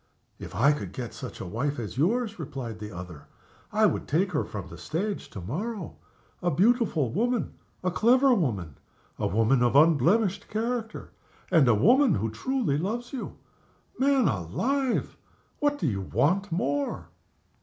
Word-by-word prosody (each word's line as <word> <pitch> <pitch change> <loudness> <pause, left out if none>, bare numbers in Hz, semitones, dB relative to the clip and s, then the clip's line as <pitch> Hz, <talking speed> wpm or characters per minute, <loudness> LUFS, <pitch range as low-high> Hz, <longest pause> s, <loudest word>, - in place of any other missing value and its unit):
"If - - -8
I 130 +9 +5
could 100 -11 -4
get 120 -1 -6
such - - -8
a - - -5
wife 130 +10 -2
as 115 -3 -5
yours," 220 - 0
replied 135 -8 -6
the 105 0 -7
other, 90 -5 -9 0.4
"I 215 +1 +3
would 185 - 0
take 180 +6 +1
her 150 - 0
from 100 -5 -7
the 85 -1 -11
stage 190 - -3
to - - -8
morrow. 185 - -4 0.5
A 175 - +1
beautiful 190 - +2
woman, 240 +4 0 0.3
a 180 - +1
clever 255 +7 +4
woman, 105 - -1 0.4
a - - +1
woman 115 +6 +2
of 120 +1 +2
unblemished 175 - +4
character, 225 0 -3 0.4
and 160 -7 +5
a 120 - +5
woman 240 - +5
who 110 +2 -1
truly 210 - -1
loves 235 - -3
you. 265 - -6 0.6
Man 270 -3 +3
alive! 235 - -1 0.4
what 290 0 +1
do 180 - -3
you 100 -8 0
want 165 - +1
more?" 145 -4 -1
165 Hz, 155 wpm, -27 LUFS, -, 0.6 s, I